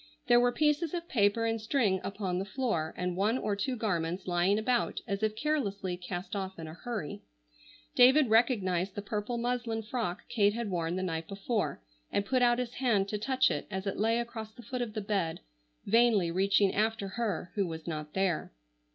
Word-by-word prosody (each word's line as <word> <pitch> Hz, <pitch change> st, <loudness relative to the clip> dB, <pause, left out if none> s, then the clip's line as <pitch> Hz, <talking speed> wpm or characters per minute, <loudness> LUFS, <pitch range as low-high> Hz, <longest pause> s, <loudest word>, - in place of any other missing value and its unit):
There 240 Hz, -, +6 dB
were 245 Hz, 0 st, +4 dB
pieces 300 Hz, +4 st, +1 dB
of 340 Hz, -1 st, -4 dB
paper 215 Hz, 0 st, +2 dB
and 225 Hz, -1 st, 0 dB
string 215 Hz, -5 st, +1 dB
upon 195 Hz, -3 st, -2 dB
the -, -, -1 dB
floor 200 Hz, -, -1 dB
and 180 Hz, -1 st, -1 dB
one 210 Hz, +6 st, +2 dB
or 210 Hz, -5 st, -1 dB
two 250 Hz, +6 st, -1 dB
garments 180 Hz, -6 st, -1 dB
lying 180 Hz, +3 st, +2 dB
about 240 Hz, +2 st, 0 dB
as 200 Hz, -1 st, -2 dB
if 215 Hz, 0 st, 0 dB
carelessly 215 Hz, -9 st, -1 dB
cast 180 Hz, +2 st, -6 dB
off 190 Hz, -1 st, -4 dB
in 165 Hz, -, -6 dB
a 155 Hz, -, -8 dB
hurry. 210 Hz, -, -5 dB, 0.7 s
David 265 Hz, +3 st, +6 dB
recognized 195 Hz, -6 st, +2 dB
the 205 Hz, -, -4 dB
purple 210 Hz, +3 st, -3 dB
muslin 235 Hz, -2 st, -1 dB
frock 215 Hz, -6 st, -3 dB
Kate 205 Hz, -3 st, +2 dB
had 230 Hz, -4 st, -3 dB
worn 170 Hz, -1 st, -1 dB
the 185 Hz, -, -2 dB
night 165 Hz, -3 st, -3 dB
before, 200 Hz, -, -2 dB, 0.3 s
and 200 Hz, -, 0 dB
put 255 Hz, +3 st, +1 dB
out 240 Hz, -1 st, +4 dB
his 245 Hz, -1 st, -3 dB
hand 215 Hz, -7 st, +1 dB
to 210 Hz, -, -2 dB
touch 260 Hz, +4 st, +2 dB
it -, -, -3 dB
as 190 Hz, -1 st, -4 dB
it 195 Hz, -, -2 dB
lay 225 Hz, +2 st, +2 dB
across 230 Hz, -2 st, -4 dB
the 240 Hz, -, -13 dB
foot 250 Hz, -1 st, -4 dB
of 230 Hz, -3 st, -3 dB
the 215 Hz, -, -1 dB
bed, 195 Hz, -5 st, -1 dB, 0.4 s
vainly 220 Hz, -5 st, +4 dB
reaching 195 Hz, +2 st, +3 dB
after 215 Hz, -1 st, 0 dB
her 205 Hz, -4 st, -2 dB
who 200 Hz, -3 st, 0 dB
was 160 Hz, -1 st, -6 dB
not 150 Hz, -2 st, -5 dB
there. 190 Hz, -4 st, 0 dB
210 Hz, 195 wpm, -30 LUFS, 185-240 Hz, 0.7 s, There